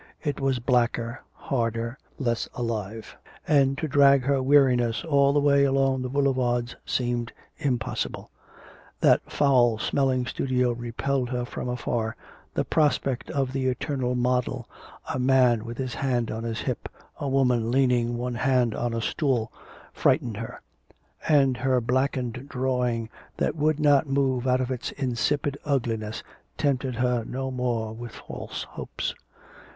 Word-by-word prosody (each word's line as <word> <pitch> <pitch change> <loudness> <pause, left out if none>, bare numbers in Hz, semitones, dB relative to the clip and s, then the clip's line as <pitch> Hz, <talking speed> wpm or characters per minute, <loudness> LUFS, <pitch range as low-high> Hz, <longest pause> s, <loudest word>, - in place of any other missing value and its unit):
It 145 -3 -2
was 135 -2 +1
blacker, 120 -1 0
harder, 115 -1 -2 0.2
less 120 -4 -1
alive. 110 -2 -4 0.3
And 140 -3 +3
to 155 - -2
drag 140 -1 +5
her 140 0 +2
weariness 130 -4 +3
all 140 -3 +4
the 145 - +3
way 140 -1 +4
along 135 -1 +2
the 125 - -3
boulevards 130 -3 0
seemed 120 -2 -1 0.3
impossible. 125 -7 -2 0.7
That - - +5
foul 125 -5 +4
smelling 130 +1 +1
studio 125 -1 0
repelled 120 +2 -2
her 125 -1 -2
from 125 - -5
afar, 120 -2 -2 0.4
the - - +1
prospect 140 -4 +1
of 135 -2 -1
the 130 -1 0
eternal 130 -1 -1
model 125 0 0 0.5
a - - -2
man 125 -3 +3
with 120 0 -6
his 130 -2 -3
hand 125 -4 -1
on 110 +1 -4
his 115 -1 -3
hip - - -3 0.3
a 140 - -2
woman 125 -4 +2
leaning 120 -2 +2
one 125 +1 -3
hand 125 -2 +2
on 120 -1 -2
a 115 - -1
stool, 120 -3 0 0.4
frightened 115 -4 +1
her; 115 0 -7 0.7
and 135 -4 +4
her 130 0 +2
blackened 125 +1 -1
drawing, 125 -3 0 0.3
that - - 0
would 155 0 +1
not 145 -1 +4
move 135 -2 +1
out 130 0 +3
of 130 0 -2
its 125 -1 -3
insipid 140 +2 -1
ugliness, 115 -6 -2 0.3
tempted 135 -3 0
her 125 -1 +1
no 130 +3 -4
more 120 -4 -1
with 120 0 -8
false - - -7
hopes. - - -5
125 Hz, 145 wpm, -26 LUFS, 120-135 Hz, 0.7 s, drag